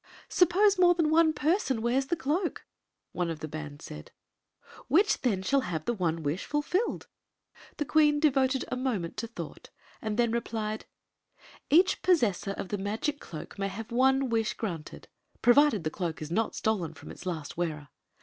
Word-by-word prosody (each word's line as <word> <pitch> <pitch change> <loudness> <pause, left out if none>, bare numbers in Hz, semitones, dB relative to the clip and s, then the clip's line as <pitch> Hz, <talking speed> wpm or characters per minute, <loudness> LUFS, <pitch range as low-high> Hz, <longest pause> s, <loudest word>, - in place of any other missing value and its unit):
" - - -21
Suppose 375 +3 +4
more 350 -1 +6
than 320 -3 +1
one 320 0 +5
person 300 - +1
wears 250 +4 +1
the 345 - +1
cloak," 325 +5 -2 0.5
one 175 -1 -2
oi 165 - -2
the 155 0 -6
band 150 -1 -7
said; 75 0 -9 0.8
"which 370 +10 +3
then 205 -8 0
shall 275 +7 +2
have 160 -7 -4
the 240 - 0
one 165 -6 -1
wish 150 +6 -2
fulfilled?" 320 +9 -1 0.7
The 295 - -1
queen 295 0 +4
devoted 265 -3 +2
a - - -2
moment 240 -10 -2
to 230 - -3
thou^^t, 170 -9 -8 0.3
and 215 -1 -3
then 235 -2 +2
replied: 220 -2 -3 0.4
" - - -27 0.2
Each 350 +5 +4
possessor 230 - +2
of 195 - -6
the 205 - -2
magic 220 +9 -2
cloak 165 +4 -9
may 195 - 0
have 220 +4 -7
one 265 +2 +3
wish 225 -2 0
granted, 170 -9 -6 0.4
provided 240 - +5
the 155 - -2
cloak 165 -5 -3
is 155 +1 -7
not 220 +5 0
stolen 180 -8 -1
from - - -11
its - - -10
last 160 -5 -4
wearer. 155 -4 -3
230 Hz, 180 wpm, -29 LUFS, 175-295 Hz, 0.8 s, more